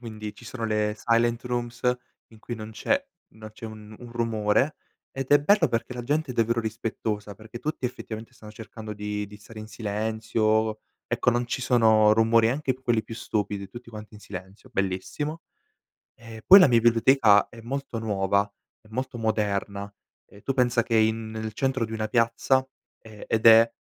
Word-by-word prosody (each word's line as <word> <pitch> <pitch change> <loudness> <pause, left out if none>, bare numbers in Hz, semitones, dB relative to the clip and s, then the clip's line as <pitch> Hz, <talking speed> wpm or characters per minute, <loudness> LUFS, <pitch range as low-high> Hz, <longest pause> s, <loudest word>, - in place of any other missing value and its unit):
quindi 110 -3 -7
ci 120 - -14
sono 115 -2 -5
le 105 -1 0
silent 115 +1 +1
rooms 120 -1 -4 0.5
in 110 - -16
cui 120 +2 -6
non 110 0 -8
c'è 280 - -1 0.3
non 110 -1 -11
c'è 115 - -9
un 110 -1 -11
un 120 -1 -11
rumore 115 +4 +1 0.3
ed 135 -1 -5
è 145 - +7
bello 160 +2 +3
perché 115 +2 -2
la 120 - -5
gente 150 +3 -1
è 125 - -5
davvero 115 0 +1
rispettosa, 110 -2 -4
perché 110 +3 -10
tutti 150 0 -4
effettivamente 115 -2 -6
stanno 105 - -13
cercando 110 -1 -9
di 105 0 -4
di 105 - -12
stare 110 +2 -13
in 110 - -8
silenzio, 110 0 -1 0.3
ecco, - - -1
non 120 +1 0
ci 130 - -3
sono 110 -4 +4
rumori, 115 0 +4
anche 135 +1 0
quelli 120 -3 0
più 115 - -9
stupidi, 105 -3 -3
tutti 120 +3 -11
quanti 110 0 -10
in 105 - -12
silenzio, 95 +6 -10
bellissimo. 100 - -3 0.7
E 115 -1 -11
poi 195 - +10
la 180 - +8
mia 120 -3 +4
biblioteca 115 -2 +5
è 115 - -13
molto 135 0 -4
nuova, 100 -2 +1 0.4
è 105 - -23
molto 125 +1 -4
moderna, 100 -2 -2 0.4
ehm, 100 - -16
tu 135 - -2
pensa 120 -2 +3
che 115 - -1
in 110 0 +1
nel 110 -1 -5
centro 130 0 0
di 110 - -11
una 110 -1 -2
piazza, 115 +3 +2 0.4
ehm, 110 -2 -11
ed 115 0 0
è 115 0 +8
115 Hz, 180 wpm, -26 LUFS, 110-120 Hz, 0.7 s, poi